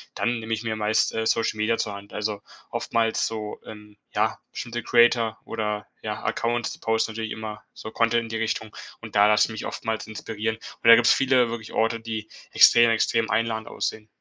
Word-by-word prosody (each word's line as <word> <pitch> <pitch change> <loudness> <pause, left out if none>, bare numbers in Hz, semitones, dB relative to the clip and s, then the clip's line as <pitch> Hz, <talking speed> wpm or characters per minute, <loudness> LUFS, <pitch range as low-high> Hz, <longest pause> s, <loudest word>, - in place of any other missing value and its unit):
dann 120 -1 0
nehme 115 0 -4
ich 110 +1 -3
mir 110 -1 -2
meist, 105 +1 +1
äh, 110 0 -1
Social-Media 110 0 +1
zur 105 -2 -2
Hand. 100 0 -12
Also 105 -1 -3 0.3
oftmals 115 -1 0
so, 110 -2 -5
ähm, 105 -1 -12 0.2
ja, - - +1
bestimmte 120 0 -5
Creator 120 -1 +3
oder 105 -2 -3 0.2
ja 105 -1 -5
Accounts 120 -3 -1
posten 110 0 0
natürlich 110 0 -5
immer 110 -1 -6
so 110 - -9
Content 115 0 +2
in 115 - -8
die 115 - -3
Richtung 110 -1 -3 0.3
und 110 -2 -10
da 105 +1 +7
lasse 105 0 +4
ich - - -9
mich 110 - -6
oftmals 110 -1 -4
inspirieren. 110 0 -4
Und 115 - -7
da 115 - +11
gibt's 120 - +5
viele 130 -3 +3
wirklich 110 -2 -7
Orte, 115 +1 +1
die 110 -1 -5 0.3
extrem, 120 0 +7
extrem 115 0 +1
einladend 110 0 -1
aussehen. 110 0 -4
110 Hz, 190 wpm, -25 LUFS, 110-115 Hz, 0.3 s, da